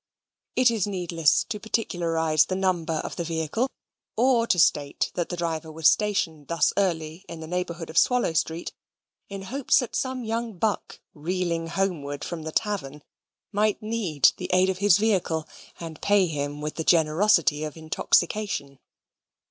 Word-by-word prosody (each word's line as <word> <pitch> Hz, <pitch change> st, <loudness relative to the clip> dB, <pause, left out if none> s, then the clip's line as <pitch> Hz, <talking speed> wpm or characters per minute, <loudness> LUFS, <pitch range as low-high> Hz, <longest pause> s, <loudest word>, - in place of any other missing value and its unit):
It 255 Hz, -2 st, +5 dB
is 215 Hz, -4 st, 0 dB
needless 175 Hz, -5 st, +1 dB
to 210 Hz, -3 st, -5 dB
particularize 165 Hz, -8 st, +1 dB
the 185 Hz, -, -2 dB
number 180 Hz, -4 st, 0 dB
of -, -, -6 dB
the 170 Hz, -, -1 dB
vehicle, 165 Hz, -, -1 dB, 0.5 s
or 240 Hz, -1 st, +3 dB
to 180 Hz, -, +2 dB
state 145 Hz, -4 st, +2 dB
that 175 Hz, -, -2 dB
the 175 Hz, -, -4 dB
driver 165 Hz, -2 st, -3 dB
was 160 Hz, 0 st, +2 dB
stationed 175 Hz, -9 st, -1 dB
thus 170 Hz, 0 st, +2 dB
early 165 Hz, -3 st, -1 dB
in 165 Hz, -, -7 dB
the 160 Hz, -, -7 dB
neighbourhood 170 Hz, -1 st, -4 dB
of 165 Hz, -, +4 dB
Swallow 250 Hz, -7 st, +2 dB
Street, 165 Hz, +1 st, -2 dB, 0.6 s
in 195 Hz, -1 st, -6 dB
hopes 260 Hz, +7 st, +1 dB
that 250 Hz, -, -1 dB
some 260 Hz, -1 st, -2 dB
young 225 Hz, -2 st, -3 dB
buck, 210 Hz, +2 st, -2 dB
reeling 170 Hz, +1 st, -2 dB
homeward 165 Hz, -6 st, -2 dB
from 170 Hz, -2 st, -5 dB
the 160 Hz, 0 st, -5 dB
tavern, 155 Hz, -9 st, -2 dB, 0.5 s
might 210 Hz, 0 st, +1 dB
need 210 Hz, -, +2 dB
the -, -, -5 dB
aid 185 Hz, +1 st, +4 dB
of 185 Hz, -, -6 dB
his 200 Hz, -3 st, +5 dB
vehicle, 185 Hz, -7 st, 0 dB, 0.3 s
and 165 Hz, -2 st, -8 dB
pay 200 Hz, -2 st, +4 dB
him 145 Hz, -2 st, -4 dB
with 150 Hz, 0 st, -5 dB
the 160 Hz, -, -1 dB
generosity 160 Hz, -1 st, +3 dB
of 155 Hz, +1 st, -6 dB
intoxication. 160 Hz, -2 st, 0 dB
175 Hz, 160 wpm, -25 LUFS, 160-205 Hz, 0.6 s, It